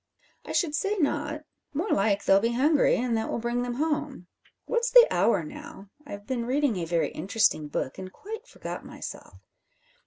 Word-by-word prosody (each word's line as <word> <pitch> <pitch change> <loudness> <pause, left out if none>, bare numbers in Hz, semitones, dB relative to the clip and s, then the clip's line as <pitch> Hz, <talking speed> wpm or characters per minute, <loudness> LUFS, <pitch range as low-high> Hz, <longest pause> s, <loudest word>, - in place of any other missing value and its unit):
"I - - -5
should 325 -5 +1
say 400 +8 0
not. 300 -1 -1 0.3
More 345 +9 -1
like 200 0 +1
they'll 195 - +6
be 230 +3 0
hungry, 285 +4 +3
and 240 -1 0
that 220 0 -1
will - - -1
bring 240 +1 -1
them 245 0 -3
home. 295 - -2 0.4
What's 475 0 0
the - - +9
hour - - +2
now? 295 -10 -10 0.2
I've 205 -6 -8
been 235 0 -3
reading 270 -4 +1
a 170 - -2
very 165 -3 0
interesting 185 -3 +1
book, 145 +2 -4
and 185 0 -7
quite 440 - -9
forgot - - -7
myself. - - -9
245 Hz, 180 wpm, -27 LUFS, 200-300 Hz, 0.4 s, the